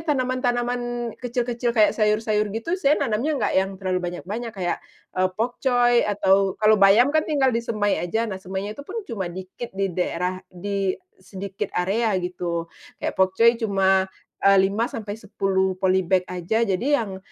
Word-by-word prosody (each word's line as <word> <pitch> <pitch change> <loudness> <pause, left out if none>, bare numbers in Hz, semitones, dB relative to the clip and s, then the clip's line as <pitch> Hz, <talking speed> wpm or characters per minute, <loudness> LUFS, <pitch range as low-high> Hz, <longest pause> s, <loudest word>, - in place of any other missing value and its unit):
tanaman-tanaman 245 -4 -1
kecil-kecil 240 -1 -2
kayak 215 -1 +5
sayur-sayur 215 -1 +1
gitu 230 +10 -3
saya 290 0 +4
nanamnya 260 +6 0
nggak 220 -6 0
yang 190 +1 +2
terlalu 185 -1 -1
banyak-banyak 195 +6 -5
kayak, 180 -2 -2 0.3
eee, 185 0 +1
pokcoy 245 0 +2
atau 195 -1 +2
kalau 215 -1 +4
bayam 215 +8 +6
kan 315 - +4
tinggal 270 -4 +2
disemai 215 -5 0
aja 200 +7 -1
nah 190 -4 -5
semainya 190 +2 -4
itu 250 - -10
pun 370 +10 -8
cuma 200 - -4
dikit 190 +4 -8
di 195 -2 -1
daerah 180 +1 -2
di 195 +1 -2 0.2
sedikit 195 0 -6
area 200 +4 +1
gitu. 175 -2 -3 0.3
Kayak - - -3
pokcoy 190 +5 +4
cuma, 190 -3 +2 0.3
eee, 195 0 +5
5-10 200 -2 0
polybag 185 -1 +2
aja 180 +6 -1
jadi 195 +3 -1 0.2
yang, 195 -3 -6
205 Hz, 145 wpm, -23 LUFS, 190-235 Hz, 0.3 s, bayam